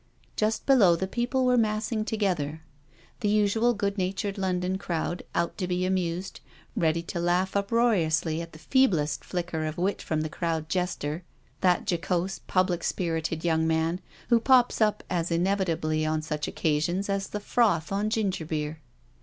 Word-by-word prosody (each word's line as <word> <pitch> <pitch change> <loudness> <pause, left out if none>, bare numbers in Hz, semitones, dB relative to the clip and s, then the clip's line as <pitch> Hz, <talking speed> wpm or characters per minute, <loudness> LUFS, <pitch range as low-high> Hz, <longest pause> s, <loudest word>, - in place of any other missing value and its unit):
Just 215 +1 0
below 215 -11 +6
the 190 - -2
people 245 +5 0
were 250 0 +4
massing 215 0 0
together; 170 -9 -1 0.6
the 210 -4 0
usual 215 +3 +3
good 200 -1 -1
natured 190 +2 -1
London 185 0 -1
crowd, 175 -1 -2
out 170 0 0
to 180 - -1
be 180 0 0
amused, 185 0 -2 0.4
ready 165 0 +1
to 170 +1 -4
laugh 180 +3 +1
uproariously 195 -7 +2
at 165 0 -8
the - - -12
feeblest 165 - +2
flicker 175 -3 -3
of 155 0 -3
wit 190 +3 0
from 155 -1 -1
the 155 - -1
crowd 160 0 -2
jester, 175 -3 -2 0.4
that 180 -2 +2
jocose, 180 +2 -1
public 185 -2 +1
spirited, 165 -2 -2
young 160 -1 +2
man 160 +3 0 0.3
who 235 - +5
pops 250 -1 +4
up 210 -1 +2
as 170 -1 -1
inevitably 170 -3 0
on 155 0 0
such 150 -1 -3
occasions 165 +5 0
as 195 -1 -1
the 210 - -4
froth 205 -7 +1
on 205 +2 0
gingerbeer. 160 -8 -2
180 Hz, 155 wpm, -27 LUFS, 160-205 Hz, 0.6 s, below